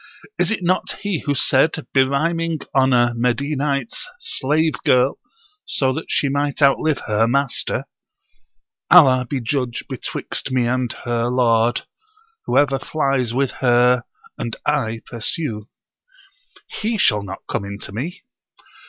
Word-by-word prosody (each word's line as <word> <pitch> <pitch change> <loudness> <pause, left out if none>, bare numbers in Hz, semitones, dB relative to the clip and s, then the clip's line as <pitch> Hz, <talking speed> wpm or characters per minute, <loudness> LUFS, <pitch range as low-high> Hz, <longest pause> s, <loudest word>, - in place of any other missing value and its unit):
Is - - +2
it 220 -4 -1
not 180 +2 0
he 200 -5 -1
who 145 - +1
said, 145 +4 +2
berhyming 160 +4 +1
on 135 -1 +3
a 120 -1 +3
Medinite's 140 - -1
slave 160 - 0
girl, 125 +2 +3 0.4
so 130 -2 0
that 160 +4 -6
she 145 - +1
might 145 +1 -1
outlive 145 +1 +3
her 110 +1 +1
master: 135 +2 0 1.0
Allah 130 -8 +6
be 140 - -1
judge 125 -1 -2
betwixt 135 0 -4
me 130 -2 +2
and 125 0 0
her 120 -1 0
lord 120 -2 +2 0.6
Whoever 135 -2 +2
flies 135 -4 -1
with 135 +1 0
her 125 -1 +4 0.4
and 115 - -3
I 115 -7 0
pursue.' 115 - -4 1.0
He 220 +1 -3
shall 105 - +3
not 95 -1 -8
come - - -2
in 100 0 -6
to - - -7
me! 155 - -5
130 Hz, 130 wpm, -20 LUFS, 120-150 Hz, 1.0 s, Allah